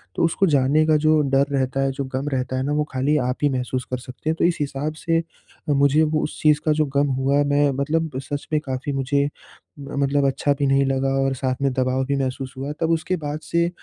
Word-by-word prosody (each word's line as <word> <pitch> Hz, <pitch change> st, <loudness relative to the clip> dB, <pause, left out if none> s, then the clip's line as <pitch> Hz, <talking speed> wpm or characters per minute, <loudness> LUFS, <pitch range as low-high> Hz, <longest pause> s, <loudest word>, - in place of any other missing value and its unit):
तो -, -, 0 dB
उसको 180 Hz, +4 st, +1 dB
जाने 145 Hz, +1 st, +3 dB
का 155 Hz, -, +4 dB
जो 155 Hz, +1 st, +3 dB
डर 135 Hz, +1 st, +3 dB
रहता 135 Hz, 0 st, 0 dB
है, 135 Hz, -, +1 dB
जो 135 Hz, +1 st, -4 dB
गम 130 Hz, +2 st, -4 dB
रहता 130 Hz, 0 st, -1 dB
है 130 Hz, -, -1 dB
ना 145 Hz, -, -2 dB
वो 150 Hz, 0 st, +1 dB
खाली 135 Hz, +4 st, +1 dB
आप 125 Hz, -1 st, -1 dB
ही 145 Hz, -, +4 dB
महसूस 130 Hz, 0 st, -2 dB
कर 130 Hz, -, 0 dB
सकते 130 Hz, +4 st, -7 dB
हैं। 160 Hz, -, +1 dB
तो -, -, +3 dB
इस 175 Hz, -1 st, +2 dB
हिसाब 145 Hz, +2 st, -2 dB
से 165 Hz, +1 st, 0 dB, 0.5 s
अ, -, -, +3 dB
मुझे 140 Hz, +3 st, +4 dB
वो 155 Hz, 0 st, 0 dB
उस -, -, -5 dB
चीज़ 150 Hz, -1 st, +4 dB
का 155 Hz, -, +3 dB
जो 155 Hz, 0 st, +1 dB
गम 140 Hz, +1 st, +3 dB
हुआ 140 Hz, +2 st, +2 dB
मैं 145 Hz, 0 st, +2 dB
मतलब 160 Hz, +2 st, 0 dB
सच 140 Hz, +2 st, -5 dB
में 155 Hz, -, +4 dB
काफ़ी 130 Hz, +2 st, -3 dB
मुझे 140 Hz, +1 st, +1 dB, 0.5 s
मतलब 140 Hz, 0 st, 0 dB
अच्छा 140 Hz, +1 st, +1 dB
भी 140 Hz, -, +2 dB
नहीं 135 Hz, 0 st, +3 dB
लगा 135 Hz, 0 st, 0 dB
और 135 Hz, 0 st, +1 dB
साथ 130 Hz, 0 st, -1 dB
में 135 Hz, -1 st, +2 dB
दबाव 130 Hz, 0 st, 0 dB
भी 140 Hz, +1 st, 0 dB
महसूस 130 Hz, 0 st, -3 dB
हुआ। 140 Hz, +2 st, -4 dB
तब 165 Hz, -, +1 dB
उसके 165 Hz, +3 st, 0 dB
बाद 150 Hz, 0 st, -4 dB
से 170 Hz, 0 st, +1 dB
140 Hz, 245 wpm, -22 LUFS, 135-150 Hz, 0.5 s, का